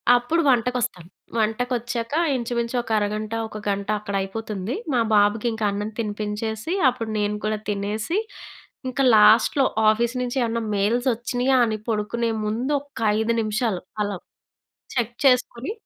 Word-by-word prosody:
అప్పుడు 245 +8 +1
వంటకొస్తాను. 245 -7 +1 0.3
వంటకొచ్చాక 235 +2 -1 0.2
ఇంచుమించు 235 0 -2
ఒక 235 - -13
అరగంట, 210 +1 -2
ఒక 215 -1 -8
గంట 200 0 -1
అక్కడ 200 -1 -5
అయిపోతుంది. 210 +1 -4 0.2
మా 240 - +3
బాబుకి 210 +2 +3
ఇంకా 220 -1 -2
అన్నం 205 +2 -3
తినిపించేసి, 215 - -3 0.2
అప్పుడు 235 -3 -5
నేను 210 0 0
కూడా 215 0 0
తినేసి, 210 - -2 0.7
ఇంక 255 +2 -7 0.2
లాస్ట్‌లో 220 +6 +6 0.2
ఆఫీస్ 235 +3 +1
నుంచి 250 +1 -2
ఏవన్నా 230 0 -1
మెయిల్స్ 230 +6 +1
ఒచ్చినియా 245 +3 +1
అని 215 - -1
పడుకునే 225 +2 -1 0.2
ముందు 240 +7 -1
ఒక్క 285 -4 -13 0.2
5 230 +1 +1
నిమిషాలు 215 -3 -1 0.2
అలా 205 -2 -3 0.8
చెక్ 240 0 0
చేసుకొని, 250 - +2
225 Hz, 130 wpm, -23 LUFS, 210-245 Hz, 0.8 s, లాస్ట్‌లో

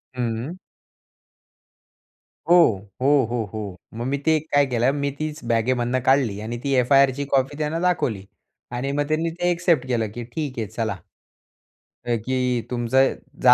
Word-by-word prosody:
हं. 120 +7 -3 1.9
हो. 175 - +7 0.5
हो, 130 - +2 0.2
हो, 120 -2 0
हो. 100 -4 -5 0.2
मग 115 +1 -4
मी 140 +1 0
ते 160 -1 +4
काय 145 0 +5
केलं, 125 +1 +2
मी 140 0 -1
तीच 155 -2 -4
बॅगेमधनं 120 +2 +1
काढली 130 -7 +3
आणि 115 +2 -4
ती 140 -1 0
एफ-आय-आरची 135 +2 +3
कॉपी 135 +2 +1
त्यांना 155 +2 -1
दाखवली. 130 - 0 0.5
आणि 125 +3 -2
मग 145 +1 -1
त्यांनी 160 +2 0
ते 175 +1 -1
एक्सेप्ट 170 -6 +1
केलं, 115 -3 0
की 120 +1 -5
ठीक 130 +1 -5
आहे, 110 - -2
चला. - - -3 1.1
अ, 120 -1 +1
की 125 -2 0
तुमचं 125 +2 +2 0.3
जा - - +9
130 Hz, 150 wpm, -23 LUFS, 120-145 Hz, 1.9 s, जा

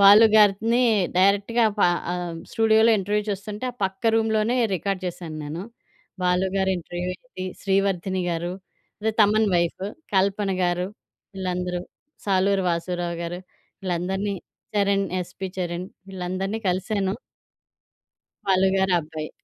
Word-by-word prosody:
బాలు 205 +3 +9
గారినీ 215 +4 +4 0.3
డైరెక్ట్‌గా 200 +5 +3
ప - - 0 0.3
ఆహ్, 175 -2 -3 0.2
స్టూడియోలో 220 0 +5
ఇంటర్వ్యూ 205 +2 0
చూస్తుంటే, 205 +4 -5
ఆ - - -28
పక్క 190 0 -4
రూమ్‌లోనే 220 +2 +2 0.2
రికార్డ్ 190 +2 -2
చేశాను 170 -3 -6
నేను. 155 +5 -5 0.6
'బాలు‌' 180 +1 +2
గారి 190 0 +2
ఇంటర్వ్యూ 175 +1 -5
ఏంటి, 185 -4 -9 0.2
'శ్రీవర్ధని' 190 -2 +1
గారు, 170 +1 -2 0.5
అదే 220 +1 0
'తమన్' 215 +1 +4
వైఫ్. 170 +2 0 0.3
'కల్పన‌' 195 0 +2
గారు, 175 0 0 0.5
వీళ్ళందరూ. 180 -1 -2 0.4
'సాలూరు 195 0 +2
వాసూరావు‌' 170 0 -2
గారు, 175 +1 -4 0.4
వీళ్ళందరినీ. 190 +3 -1 0.4
చరణ్ 200 -1 +2
'యస్‌పి 180 +1 -4
చరణ్' 175 0 -3 0.2
వీళ్ళందరినీ 190 +3 -3
కలిశాను. 190 +1 0 1.3
'బాలు' 190 -1 +3
గారబ్బాయి. 165 -5 0
190 Hz, 115 wpm, -24 LUFS, 180-200 Hz, 1.3 s, బాలు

